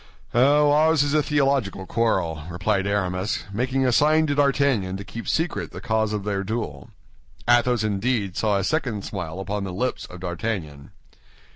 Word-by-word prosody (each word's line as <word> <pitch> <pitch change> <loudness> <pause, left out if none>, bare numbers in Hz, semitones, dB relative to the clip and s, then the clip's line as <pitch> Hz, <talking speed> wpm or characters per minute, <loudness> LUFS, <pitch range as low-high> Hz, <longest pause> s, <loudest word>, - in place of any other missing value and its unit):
"Oh, 145 +4 +5
ours 155 0 +4
is 145 0 -1
a 155 - +4
theological 135 -10 0
quarrel," 90 -9 0
replied 95 +3 0
Aramis, 95 -1 -1
making 130 +4 0
a 125 - +3
sign 155 +5 +4
to 145 - 0
D'Artagnan 140 -9 +1
to 100 - -7
keep 115 +3 -8
secret 165 +2 -1
the - - -9
cause 110 -3 0
of 105 -2 -2
their 100 -1 -2
duel. 95 - -4 0.6
Athos 120 -1 +3
indeed 105 -1 -1
saw 105 -2 +1
a 100 - -1
second 115 - -1
smile 95 -1 -5
on 105 0 -2
the 95 - -4
lips 125 +8 -2
of 90 0 -11
D'Artagnan. 85 -6 -4
110 Hz, 165 wpm, -24 LUFS, 95-135 Hz, 0.6 s, Oh